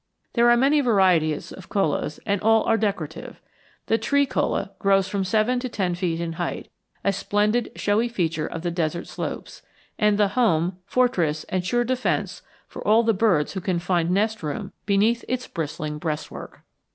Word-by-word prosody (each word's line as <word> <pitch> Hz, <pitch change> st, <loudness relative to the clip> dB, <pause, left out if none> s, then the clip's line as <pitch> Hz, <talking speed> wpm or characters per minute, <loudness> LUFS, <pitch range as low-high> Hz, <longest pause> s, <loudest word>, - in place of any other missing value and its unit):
There 235 Hz, 0 st, +4 dB
are 240 Hz, -, +6 dB
many 280 Hz, +4 st, +4 dB
varieties 185 Hz, -, +2 dB
of 190 Hz, -, -11 dB
chollas 155 Hz, -6 st, -1 dB
and 200 Hz, -3 st, 0 dB
all 225 Hz, +1 st, +4 dB
are 225 Hz, -, +2 dB
decorative. 195 Hz, -8 st, -3 dB, 0.5 s
The 225 Hz, -, +1 dB
tree 280 Hz, +6 st, +2 dB
cholla -, -, -1 dB
grows 195 Hz, -1 st, +3 dB
from 195 Hz, 0 st, -1 dB
seven 220 Hz, +6 st, +1 dB
to 255 Hz, 0 st, -4 dB
ten 185 Hz, -6 st, -1 dB
feet 175 Hz, -2 st, -2 dB
in 170 Hz, -1 st, -3 dB
height, 175 Hz, -, -4 dB, 0.3 s
a 200 Hz, -, +2 dB
splendid 210 Hz, +4 st, 0 dB
showy 210 Hz, +3 st, +1 dB
feature 165 Hz, -8 st, -1 dB
of 165 Hz, -, -6 dB
the 175 Hz, -, -1 dB
desert 170 Hz, 0 st, -2 dB
slopes, -, -, -6 dB, 0.4 s
and 210 Hz, -1 st, +3 dB
the 205 Hz, -1 st, +3 dB
home, 185 Hz, -6 st, +1 dB
fortress, 175 Hz, -12 st, +1 dB
and 185 Hz, -1 st, -1 dB
sure 240 Hz, +6 st, +1 dB
defense 255 Hz, +1 st, -1 dB, 0.3 s
for -, -, -9 dB
all 220 Hz, +3 st, +4 dB
the 225 Hz, 0 st, +3 dB
birds 185 Hz, -8 st, +2 dB
who 190 Hz, -, -4 dB
can 180 Hz, -1 st, -1 dB
find 175 Hz, -1 st, 0 dB
nest 215 Hz, +4 st, +1 dB
room 160 Hz, +6 st, -4 dB, 0.2 s
behind 215 Hz, +4 st, +2 dB
its 255 Hz, 0 st, -2 dB
bristling 150 Hz, -1 st, -4 dB
breastwork. 155 Hz, -1 st, -5 dB
200 Hz, 175 wpm, -24 LUFS, 170-225 Hz, 0.5 s, are